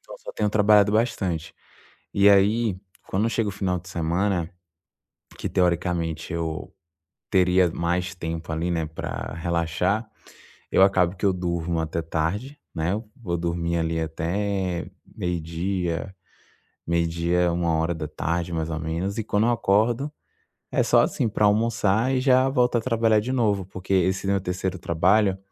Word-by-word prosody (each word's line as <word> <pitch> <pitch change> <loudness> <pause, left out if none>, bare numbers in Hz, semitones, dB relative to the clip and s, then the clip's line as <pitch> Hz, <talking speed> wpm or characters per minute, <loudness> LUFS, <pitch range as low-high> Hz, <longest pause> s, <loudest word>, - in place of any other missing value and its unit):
Então - - -12
só - - -9
tenho 105 -1 0
trabalhado 105 -1 +5
bastante. 100 -7 -1 0.6
E 100 0 +4
aí, 100 +2 +4 0.3
quando 105 +4 0
chega 115 -1 0
o - - -4
final 95 -2 -1
de 90 +1 -13
semana, 85 +1 0 0.9
que - - -3
teoricamente 85 -3 0
eu 80 -1 -4 0.6
teria 90 -2 +4
mais 90 +3 -1
tempo 80 -2 -5
ali, 80 +2 -1
né, 80 -2 -1
pra 80 0 -5
relaxar, 85 +5 -1 0.6
eu - - +4
acabo 95 -2 +4
que 100 - -2
eu 95 - +4
durmo 85 -2 -2
até 80 +1 -2
tarde, 90 - -2 0.2
né. 80 +3 -1 0.2
Vou 90 -8 -3
dormir 85 0 -1
ali 80 0 -1
até 90 +3 -2 0.3
meio 90 -1 -2
dia, 85 +2 -3 0.7
meio 85 0 +1
dia, 85 +1 +1
13:00, 85 0 -1
mais 80 -1 -2
ou 80 -1 -3
menos. 85 +5 -3
E 110 - -1
quando 105 +1 +1
eu - - +3
acordo, 115 +6 +1 0.6
é - - +2
só, - - +5
assim, 115 - 0
pra 105 0 +1
almoçar 110 +2 +2
e 130 - +2
já 130 0 +4
volto 125 -3 +2
a - - 0
trabalhar 115 -2 +2
de 125 +4 -3
novo, 105 -7 +1
porque 95 +1 -5
esse 95 +1 +1
meu 100 -1 +1
terceiro 90 +1 -3
trabalho, 95 +4 +2
90 Hz, 150 wpm, -24 LUFS, 85-105 Hz, 0.9 s, trabalhado